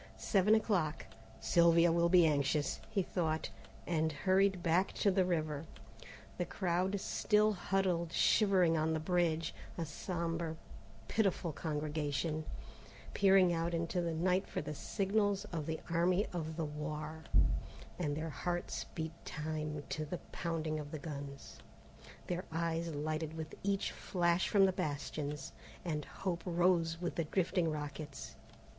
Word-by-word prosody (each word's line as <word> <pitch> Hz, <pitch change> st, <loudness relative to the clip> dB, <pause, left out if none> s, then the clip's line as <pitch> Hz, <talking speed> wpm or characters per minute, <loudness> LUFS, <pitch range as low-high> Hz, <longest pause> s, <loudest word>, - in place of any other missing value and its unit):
Seven 190 Hz, -, +4 dB
o'clock. 185 Hz, -8 st, 0 dB, 0.3 s
"Sylvia 170 Hz, 0 st, +5 dB
will 170 Hz, +1 st, +3 dB
be 175 Hz, -1 st, +7 dB
anxious," 145 Hz, -1 st, +1 dB
he 195 Hz, -, +1 dB
thought, 160 Hz, -3 st, -1 dB, 0.3 s
and 160 Hz, -2 st, +1 dB
hurried 190 Hz, +3 st, +2 dB
back 175 Hz, +3 st, +2 dB
to 200 Hz, -, +2 dB
the 185 Hz, 0 st, +3 dB
river. 155 Hz, -3 st, -1 dB, 0.7 s
The 175 Hz, -, +1 dB
crowd 185 Hz, +2 st, 0 dB
still 210 Hz, +2 st, +2 dB
huddled 185 Hz, -3 st, 0 dB
shivering 185 Hz, -4 st, +4 dB
on 160 Hz, 0 st, +1 dB
the 160 Hz, -, 0 dB
bridge, 165 Hz, -1 st, +1 dB, 0.2 s
a 165 Hz, -, -1 dB
sombre 165 Hz, +1 st, -3 dB, 0.5 s
pitiful 195 Hz, -, +1 dB
congregation, 155 Hz, 0 st, -2 dB, 0.7 s
peering 190 Hz, -3 st, +5 dB
out 170 Hz, +1 st, 0 dB
into 165 Hz, +2 st, -1 dB
the 170 Hz, -1 st, -1 dB
night 180 Hz, +3 st, +1 dB
for -, -, -3 dB
the 150 Hz, -, -4 dB
signals 200 Hz, +6 st, 0 dB
of 155 Hz, -3 st, -3 dB
the 160 Hz, 0 st, -2 dB
Army 175 Hz, +4 st, +2 dB
of 160 Hz, -2 st, -4 dB
the 165 Hz, -, 0 dB
Loire: 150 Hz, +1 st, -5 dB, 0.8 s
and 150 Hz, -4 st, -1 dB
their 160 Hz, 0 st, -3 dB
hearts 175 Hz, +2 st, -3 dB
beat 160 Hz, -1 st, -3 dB
time 150 Hz, -1 st, -4 dB
to 155 Hz, -, -2 dB
the 155 Hz, +4 st, -4 dB
pounding 160 Hz, -2 st, -2 dB
of 145 Hz, -1 st, -6 dB
the 155 Hz, -, -5 dB
guns, 140 Hz, -2 st, -7 dB, 0.7 s
their 180 Hz, 0 st, -2 dB
eyes 165 Hz, 0 st, -1 dB
lighted 155 Hz, +1 st, -2 dB
with 160 Hz, -1 st, -6 dB
each 200 Hz, 0 st, 0 dB
flash 175 Hz, -1 st, +1 dB
from 200 Hz, -2 st, +6 dB
the 190 Hz, -, +2 dB
bastions, 145 Hz, -2 st, -3 dB, 0.3 s
and 150 Hz, -4 st, -2 dB
hope 180 Hz, -3 st, -3 dB
rose 170 Hz, -2 st, +2 dB
with 175 Hz, -1 st, -2 dB
the 165 Hz, -, -1 dB
drifting 175 Hz, 0 st, +1 dB
rockets. 150 Hz, -1 st, -6 dB
165 Hz, 140 wpm, -35 LUFS, 155-180 Hz, 0.8 s, be